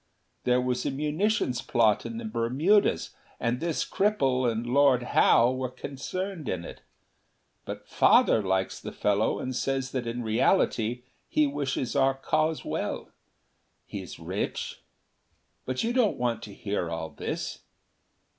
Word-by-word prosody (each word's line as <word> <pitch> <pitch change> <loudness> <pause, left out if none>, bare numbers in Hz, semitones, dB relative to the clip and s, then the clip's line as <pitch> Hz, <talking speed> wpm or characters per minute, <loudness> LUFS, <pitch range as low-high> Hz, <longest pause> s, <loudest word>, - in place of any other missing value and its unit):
There 125 0 +4
was 125 0 -1
a - - 0
munitions 150 - 0
plot 110 -3 +2
in 230 - -6
the 235 - -5
Bermudas, 160 - +2 0.3
and 120 +1 0
this 165 -1 -1
cripple 135 - +2
and 115 +1 -3
Lord 130 0 +4
Howe 120 +2 +5
were 130 0 -2
concerned 155 - -5
in 85 -2 -3
it. - - -10 0.8
But - - -7
Father 110 - +5
likes 95 -1 -1
the - - -7
fellow 105 +1 +1
and 130 0 -4
says 135 0 -1
that 125 -3 -3
in 120 +1 -3
reality 115 - +1 0.3
he 155 - +3
wishes 140 -3 -2
our 135 -1 +3
cause 155 +3 0
well. - - -3 0.8
He - - -6
is - - -9
rich. - - -4 0.9
"But 130 0 -1
you 235 +1 0
don't 240 -5 +2
want 120 -2 -1
to 105 - -10
hear 100 -5 -2
all 80 -1 -4
this. - - -4
130 Hz, 145 wpm, -28 LUFS, 115-150 Hz, 0.9 s, Howe